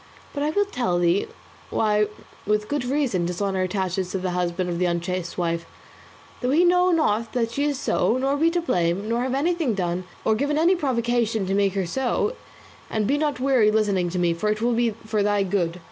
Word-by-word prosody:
But 285 - -3
I 295 - +1
will 405 +6 +2
tell 240 - -1
thee 175 +2 +2 0.4
why 210 -1 +2 0.4
with 210 0 +1
good 290 -1 -2
reason 245 -10 0
dishonour 190 +1 -1
attaches 185 -1 -1
to 190 - -2
the 185 -1 -2
husband 180 0 -1
of 175 -1 -2
the 180 - +2
unchaste 175 0 -3
wife, 170 -1 -1 0.7
though 250 - 0
he 320 +6 +4
know 360 +1 +4
not 230 - +1
that 230 -2 0
she 280 +5 -1
is 290 -2 0
so, 255 -2 +1
nor 270 +2 +1
be 320 +3 +3
to 345 +1 0
blame, 180 - 0
nor 235 +2 0
have 255 0 -1
done 275 +3 0
anything, 205 - 0 0.2
or 220 - +4
given 285 +6 0
any 340 +4 +4
provocation 235 - 0
to 190 - -1
make 200 -1 +2
her 195 -2 0
so; 265 - -1 0.6
and 215 -1 0
be 280 +6 +1
not 295 -4 -1
weary 255 -4 +3
with 215 - +2
listening 200 -5 +1
to 180 - -4
me, 175 -1 +2
for 190 +6 -1
it 215 0 0
will 240 +2 +1
be 235 0 +2
for 220 0 -3
thy 205 0 +2
good. 180 -2 -1
215 Hz, 215 wpm, -24 LUFS, 185-270 Hz, 0.7 s, he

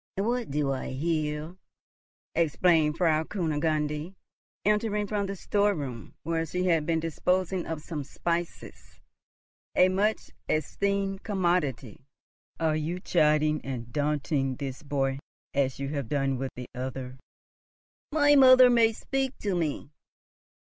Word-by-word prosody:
"What 235 +4 -1
do 140 -1 0
I 135 - -3
hear?" 155 +2 -2 0.8
exclaimed 165 -1 +3
Frau 160 -3 +3
Kunigunde, 155 -1 -1 0.5
entering 210 0 +1
from 205 -1 -1
the 195 - -4
storeroom, 175 - -1
where 165 0 0
she 180 +3 -2
had 165 -4 +2
been 165 -1 +2
disposing 180 +3 -1
of 160 -2 -4
some 155 -3 -4
spices, 170 +4 -4 0.8
a 185 - +6
much 205 +4 0 0.2
esteemed 195 +5 -1
commodity. 170 - -1 0.5
"Are 160 -2 +1
you 160 +4 -2
chiding 155 -4 +2
and 120 -3 -6
daunting 145 -2 0
this 135 -1 -6
boy, 135 -2 -1 0.3
as 135 -2 +1
you 140 0 -3
have 140 -6 -3
done 135 -3 0
with 135 0 -2
the 125 - -6
other?" 130 0 -5 0.9
"My 290 -1 +5
mother 255 -2 +8
may 230 -2 +4
speak 270 +3 -2
to 200 -2 -1
me!" 155 -4 -2
160 Hz, 125 wpm, -28 LUFS, 145-190 Hz, 0.9 s, mother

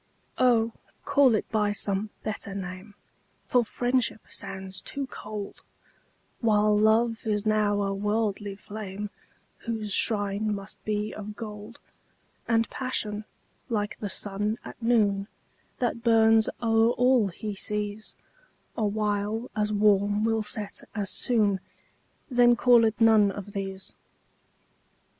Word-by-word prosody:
Oh, 235 -3 +4 0.3
call 270 -5 +5
it - - -1
by 210 -2 +1
some 200 +1 -1
better 200 -2 -4
name, 190 +2 -7 0.5
For 245 -1 +3
Friendship 245 0 0
sounds 190 0 -5
too 280 0 -4
cold, 210 -5 -7 0.8
While 210 -2 +3
Love 225 +2 +2
is 210 -1 0
now 210 -1 +2
a 195 0 -1
worldly 205 0 -1
flame, 205 0 -7 0.6
Whose 220 -3 -2
shrine 205 0 +1
must 200 0 -8
be 210 0 -1
of 210 0 -7
gold: 210 0 -8 0.7
And 230 -1 +2
Passion, 215 -5 -2 0.4
like 210 -3 -2
the 205 - -3
sun 205 +3 -1
at - - -10
noon, 205 -4 +2 0.5
That 235 -2 -1
burns 225 -1 +5
o'er 225 0 +4
all 250 -3 +4
he 205 +3 -5
sees, 210 +1 -3 0.6
Awhile 210 +1 -1
as 210 0 0
warm 205 0 +3
will 225 -1 +1
set 210 -1 -4
as 205 -3 -2
soon 210 -6 +2 0.7
Then 245 -2 +5
call 240 -1 +5
it 220 0 0
none 220 -3 +6
of 205 +1 -8
these. 195 -1 -4
210 Hz, 120 wpm, -27 LUFS, 205-225 Hz, 0.8 s, none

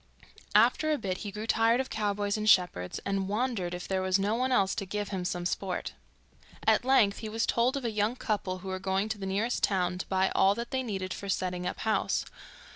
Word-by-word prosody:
After 310 0 +4
a 300 - +2
bit 190 -7 -3
he 205 - -5
grew 210 +2 -5
tired 225 +2 +3
of 265 - -3
cowboys 205 -1 -1
and 215 0 0
shepherds, 180 - +3
and 195 -1 -1
wondered 210 -5 -1
if 180 - -7
there 190 -1 0
was 185 0 +2
no 200 +2 0
one 255 +3 0
else 195 -6 +3
to 195 - -3
give 205 +1 -3
him 190 -3 -3
some 175 0 -3
sport. 185 +1 -2 0.7
At - - +4
length 245 -6 +3
he 220 - -5
was 225 +1 0
told 250 +4 +2
of 270 - -5
a 230 - 0
young 210 +3 0
couple 205 -7 -2
who - - -4
were 185 0 -3
going 195 +2 -1
to 220 -1 -3
the 195 - -4
nearest 210 +6 -1
town 180 -2 +1
to - - -5
buy 190 0 +1
all 195 +1 +4
that 235 0 -5
they 260 -1 0
needed 190 -6 -3
for 200 - -7
setting 180 -1 -1
up - - -4
house. 220 -1 0
200 Hz, 230 wpm, -29 LUFS, 190-225 Hz, 0.7 s, After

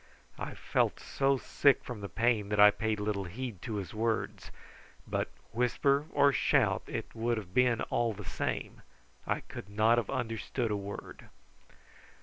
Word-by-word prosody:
I - - -5
felt - - 0
so 135 0 +1
sick 140 +2 +3
from 120 -4 -7
the 100 - -5
pain 115 -3 +1
that 105 0 0
I 105 0 +9
paid 110 0 -1
little 105 -2 -1
heed 110 +1 -6
to 115 -4 -4
his 100 -3 -4
words; 110 +1 -2 0.6
but - - -1 0.2
whisper 140 +5 +2
or 140 -1 +4
shout - - +3
it - - -5
would 115 +1 0
have 95 -4 -7
been 125 -1 +3
all 120 -1 +2
the 105 -1 -8
same, - - -3 0.5
I - - 0
could 100 - -9
not 110 +3 +4
have 115 - -4
understood 120 -1 -2
a - - +1
word. 100 0 -7
115 Hz, 160 wpm, -31 LUFS, 105-125 Hz, 0.6 s, I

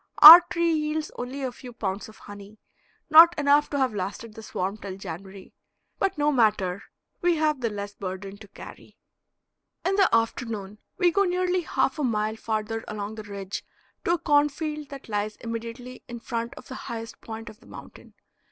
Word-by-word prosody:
Our 325 +4 +14
tree 340 -1 +1
yields 305 0 -2
only 260 +3 -6
a 260 - -2
few 245 0 -12
pounds 200 -2 -4
of 220 - -16
honey, 205 +1 -12 0.5
not 335 +2 +8
enough 290 0 +3
to 285 - -2
have 260 -4 +1
lasted 205 +3 -5
the 220 - -10
swarm 195 -1 -4
till 195 -3 -8
January, 190 +1 -9 0.5
but 390 -3 0
no 295 0 +2
matter; 210 -7 +1 0.4
we 350 -1 +2
have 305 -3 0
the 230 - 0
less 205 -1 -6
burden 195 +1 -7
to 215 - -13
carry. 200 - -13 0.9
In 390 +1 +1
the 390 -2 +4
afternoon 225 -3 -1 0.2
we 355 -2 +3
go 400 +4 +2
nearly 365 0 0
half 305 -3 -1
a - - -1
mile 215 -3 0
farther 220 0 -3
along 210 0 -5
the 220 - -7
ridge 200 -1 -7 0.4
to 340 - +2
a - - +1
cornfield 295 0 0
that 275 -2 -10
lies 210 0 -2
immediately 230 +2 -7
in 240 -1 -7
front 235 0 -4
of - - -13
the - - -8 0.2
highest 230 -1 -7
point 225 0 -8
of 215 +1 -11
the - - -20
mountain. - - -13
230 Hz, 180 wpm, -25 LUFS, 210-295 Hz, 0.9 s, Our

